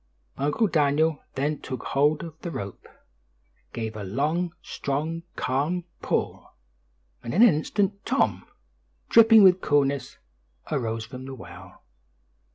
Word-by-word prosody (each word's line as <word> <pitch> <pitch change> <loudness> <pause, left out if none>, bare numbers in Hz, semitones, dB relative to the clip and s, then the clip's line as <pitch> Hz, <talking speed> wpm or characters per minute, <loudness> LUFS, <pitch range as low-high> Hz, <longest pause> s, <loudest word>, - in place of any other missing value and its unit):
Uncle 145 +11 +1
Daniel 155 -3 +2
then 145 +2 -1
took 130 -3 -6
hold 150 +3 +1
of 165 -2 -7
the 175 - -4
rope, 100 - -7 0.8
gave 110 -1 -5
a 105 - -6
long, 150 - -1
strong, 155 +4 -3
calm 150 +8 -1 0.2
pull, - - -3 0.7
and 115 - -5
in 215 - +6
an 230 -8 +7
instant, 200 +6 -1
Tom, 270 - 0 0.6
"dripping 225 -2 +7
with 185 -1 +6
coolness, 140 -2 0 0.5
arose 115 -6 -2
from 125 +2 -9
the 135 0 -7
well." - - -13
150 Hz, 125 wpm, -25 LUFS, 130-175 Hz, 0.8 s, an